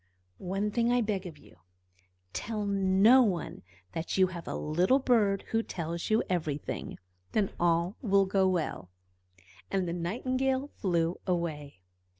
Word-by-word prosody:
"One 195 +3 -2
thing 235 +2 +1
I 245 0 +3
beg 200 -4 -2
of 160 -4 -10
you: 90 - -19 0.8
tell 215 -2 -3
no 200 +5 +5
one 185 -9 -1 0.3
that 165 - -3
you 190 - +6
have 175 -3 -7
a - - -3
little 175 - +2
bird 220 -7 +2
who 225 - +2
tells 170 -5 -4
you 220 +1 +3
everything. 155 -5 -3 0.4
Then 205 -3 +1
all 170 +3 +1
will 200 -5 +3
go 190 0 +2
well." 160 - -2 0.8
And 190 -2 0
the 170 - -2
Nightingale 255 +10 -1
flew 170 -3 0
away. 155 - -3
190 Hz, 145 wpm, -30 LUFS, 170-215 Hz, 0.8 s, you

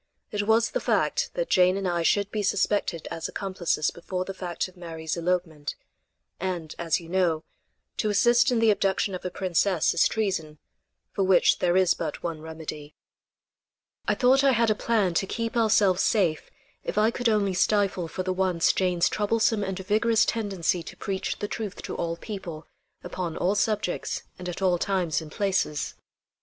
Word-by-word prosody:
It 205 0 -2
was 225 +1 +3
the - - -1
fact - - +1
that - - -2
Jane 185 +1 +4
and 195 -1 -2
I 175 -1 0
should 200 +4 +2
be 215 - -1
suspected 195 -4 0
as 165 - -3
accomplices 185 -6 -1
before 180 +2 -4
the 195 - -5
fact 180 -2 -3
of 185 - -17
Mary's 165 -3 -5
elopement; 170 -4 -2 0.6
and, 175 -4 -3
as 165 -2 +1
you 170 - -12
know, 170 -3 +1 0.5
to 215 - 0
assist 240 +5 +4
in 245 - +2
the 225 -1 +5
abduction 195 0 0
of 185 - -5
a 180 - -2
princess 185 -2 +1
is 170 - +4
treason 185 -8 -2 0.5
for 195 - 0
which 190 -1 +4
there 175 0 +2
is 185 -2 +4
but - - -5
one 165 -3 -4
remedy. 155 -2 -8 1.1
I - - +2
thought 265 +1 +4
I 275 -1 +5
had 230 -1 +3
a - - +5
plan 210 -4 +1
to 190 +3 0
keep 230 +3 -3
ourselves 210 -5 +3
safe 175 -8 +1 0.3
if - - -4
I 215 +2 +4
could 245 0 0
only 205 -3 +2
stifle 190 -2 +1
for 185 +4 -4
the 185 0 -1
once 185 -3 +2
Jane's 180 -2 +2
troublesome 220 0 +1
and 190 -1 -3
vigorous 215 +4 +2
tendency 195 -6 -1
to - - -10
preach 195 -1 -3
the 205 - -3
truth 210 -2 -5
to - - -5
all 170 0 -2
people, 175 -7 -7 0.4
upon 175 -2 -4
all 185 +3 +1
subjects 210 -3 -1 0.2
and 180 0 -5
at 175 +2 -5
all 180 -2 +3
times 180 -5 0
and 155 -1 -10
places. 190 -7 -1
190 Hz, 180 wpm, -26 LUFS, 170-210 Hz, 1.1 s, the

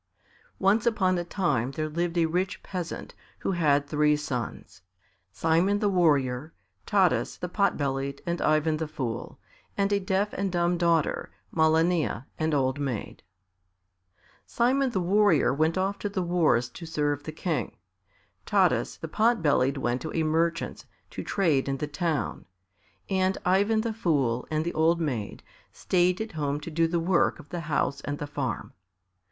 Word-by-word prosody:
Once 205 +4 +2
upon 190 -5 +2
a - - -2
time 170 - 0
there 155 +2 -2
lived 170 +2 -2
a 165 - +4
rich 180 +4 -2
peasant, 180 -3 -5 0.3
who - - 0
had 145 -5 +2
three 150 0 +2
sons 130 -6 -5 0.5
Simon 165 - +2
the 205 -1 +1
Warrior, 150 -6 +1 0.3
Taras 190 -4 +2
the 180 - -4
Pot 200 +3 +1
bellied, 140 0 -2
and 170 0 -2
Ivan 155 0 +2
the 160 0 -3
Fool, 130 -7 -5 0.4
and 200 0 +1
a 200 - +3
deaf 195 +1 0
and 195 0 -2
dumb 175 0 +1
daughter, 170 -3 +1 0.3
Malania, 160 -5 +2
an 160 0 +1
old 130 0 +1
maid. 130 -7 -4 1.3
Simon 260 +3 +2
the 215 -6 -1
Warrior 185 -5 +3
went 160 +4 +1
off 195 +2 -1
to 205 - -2
the 190 -2 -2
wars 165 -9 +2
to 165 +6 -10
serve 145 -2 -1
the 155 - -6
King; 165 +1 -3 0.7
Taras - - +2
the - - -6
Pot 225 -2 +2
bellied 140 -2 +2
went 125 -1 -1
to 160 - -5
a 165 - +1
merchant's 165 +2 -1 0.3
to - - -5
trade 155 -9 +1
in 135 - -1
the 150 - -2
town, 150 +1 -2 0.6
and 190 -1 +1
Ivan 200 +4 +3
the 230 0 -2
Fool 140 - 0
and 155 0 -1
the 170 - -2
old 165 +2 +3
maid 125 -10 -3 0.3
stayed 180 0 +1
at 220 0 -4
home 145 -2 -2
to 165 - -7
do 165 +1 +2
the 170 +1 0
work 170 +1 +2
of 155 -3 -14
the 175 - -4
house 140 -1 0
and 145 +1 -4
the 145 - -4
farm. 140 -6 -4
165 Hz, 165 wpm, -27 LUFS, 145-185 Hz, 1.3 s, a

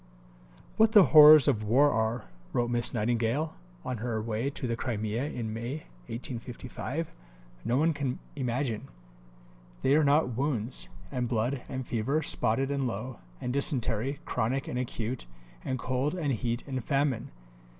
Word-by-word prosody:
"What 220 0 +5
the 205 -4 +9
horrors 150 -2 +10
of 120 -7 +2
war 135 +7 +4
are," 110 +1 0 0.3
wrote 120 0 +1
Miss 120 -1 +2
Nightingale 120 +6 0 0.3
on 125 - -2
her 115 0 -2
way 110 +4 -2
to 140 -2 -5
the 115 -1 -1
Crimea 115 0 -2
in 115 -7 -4
May 120 +7 -4 0.3
1855, 125 +5 -5 0.5
"no 120 - +1
one 160 +3 +3
can 140 -4 -2 0.2
imagine. 125 -3 -2 1.0
They 135 - +4
are 155 - +4
not 140 -4 +3
wounds, 130 -3 -2 0.2
and 125 -3 -1
blood, 120 +3 0
and 130 -1 -4
fever, 135 +8 0
spotted 135 +5 0
and 140 -2 0
low, 120 +2 -5 0.2
and 125 - -3
dysentery, 130 -1 +1
chronic 130 +5 -1
and 125 - -2
acute, 120 - -4 0.4
and 130 - -2
cold 130 +6 -1
and 150 -6 0
heat 120 +1 -2
and 130 -3 -4
famine. 140 -3 0
125 Hz, 150 wpm, -29 LUFS, 115-140 Hz, 1.0 s, horrors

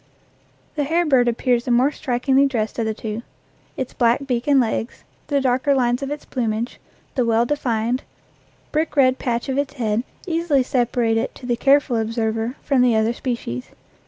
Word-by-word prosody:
The 295 - +2
hair 330 +5 +1
bird 260 -5 +4
appears 240 0 +1
the - - -3
more 250 +4 +4
strikingly 265 +1 +2
dressed 230 -4 -2
of 225 - 0
the 220 - 0
two. 220 0 -5 0.6
Its 260 -1 -4
black 240 +3 +2
beak 245 -1 -2
and 280 -2 +5
legs, 230 -1 -2 0.2
the 285 -1 +1
darker 260 +1 +2
lines 245 0 +1
on 275 - -3
its 295 0 -5
plumage, 230 -1 -2 0.3
the 255 - +1
well 230 0 +2
defined, 240 -3 -1 0.7
brick 310 0 -1
red 260 -2 +4
patch 240 0 -2
on 265 0 0
its 285 0 -2
head 225 -2 0 0.2
easily 330 -6 +1
separate 240 -2 +1
it 225 - -2
to 255 - -11
the 240 -1 +1
careful 275 -1 +3
observer 225 +1 -1
from 275 -3 +2
the 245 -2 +4
other 220 +1 +2
species. 235 - -4
245 Hz, 180 wpm, -21 LUFS, 230-275 Hz, 0.7 s, and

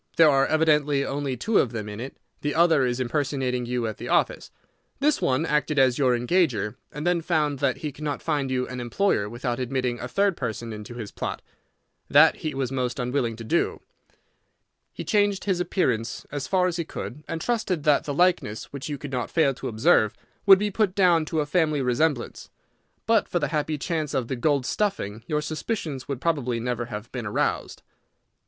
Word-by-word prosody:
There 160 -2 +7
are 135 0 +3
evidently 150 -3 +2
only 135 -2 -2
two 220 - +2
of 125 - +1
them 110 -2 -4
in 105 0 -7
it. 130 +3 -7 0.2
The 145 0 -2
other 160 -5 +4
is 120 0 -2
impersonating 130 -1 -1
you 125 -1 -1
at 110 -1 -4
the - - -7
office. - - +1 0.5
This 295 +2 +2
one 135 +5 +1
acted 150 -1 0
as 130 -1 +4
your 125 -3 +3
engager, 120 - +1 0.2
and 150 +2 -6
then 175 -1 +2
found 150 -4 0
that 135 -2 +1
he 150 - -4
could 150 - -11
not 145 -2 -2
find 145 -4 -1
you 125 -1 -1
an 125 0 -6
employer 120 - 0
without 120 +2 -3
admitting 125 -1 -1
a - - -4
third 195 +6 +1
person 115 -2 -4
into 105 +3 -8
his 110 -4 -6
plot. - - -5 0.7
That - - +6
he 155 - -4
was 135 -2 -2
most 125 -2 -2
unwilling 125 -2 -1
to 115 - -8
do. 170 +10 0 1.1
He - - -7
changed 205 -2 +1
his 190 -3 0
appearance 120 - -1
as 145 -2 -4
far 185 -1 +2
as 180 -2 -1
he 170 - -1
could, 150 -2 -7
and 165 - -3
trusted 215 -7 -1
that 150 -1 +3
the 145 - -2
likeness, 175 - +1
which 140 +1 -5
you 145 - -3
could 140 0 -8
not 125 -2 -2
fail 150 -5 +2
to - - -6
observe, 110 -1 +3 0.3
would 195 -1 +10
be 205 +1 -1
put 200 -2 +1
down 175 -5 +4
to 155 0 -1
a - - -1
family 155 -3 +1
resemblance. 125 +1 0 0.6
But 225 -1 +3
for - - -1
the - - 0
happy 155 0 -1
chance 155 -1 -2
of 125 -3 -1
the 130 - -1
gold 140 +1 +1
stuffing, 125 - -2
your 150 -1 0
suspicions 155 - -4
would 140 -3 -3
probably 130 -8 0
never 120 0 -2
have 110 0 -7
been 120 -4 -4
aroused." 105 - -2
140 Hz, 200 wpm, -25 LUFS, 125-160 Hz, 1.1 s, would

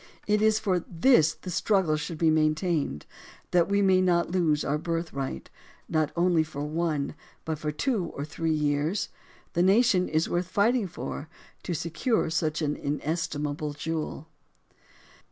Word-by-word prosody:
It 210 0 +2
is 215 0 +4
for 190 -4 +1
this 165 - +4
the 185 - -8
struggle 180 -3 +2
should 155 +2 -4
be 160 0 +3
maintained, 155 - 0 0.5
that 175 0 +3
we 200 0 +3
may 190 -1 +4
not 170 -2 +2
lose 165 -5 +1
our 145 +2 0
birthright 160 - -4 0.2
— - - -30
not 155 -2 +1
only 175 -1 +3
for 150 -2 -6
one, 155 -1 -1 0.3
but 160 -2 -3
for 150 -1 -2
two 210 - 0
or 140 - -3
three 160 +2 -3
years. 150 +4 0 0.4
The 170 - +2
nation 195 -1 +4
is 155 +1 +1
worth 175 0 -1
fighting 210 +3 +2
for, 160 -2 -6 0.3
to 175 - -3
secure 170 - 0
such 155 -1 0
an 150 0 0
inestimable 150 0 -2
jewel. 160 0 -4
165 Hz, 155 wpm, -27 LUFS, 150-185 Hz, 0.5 s, is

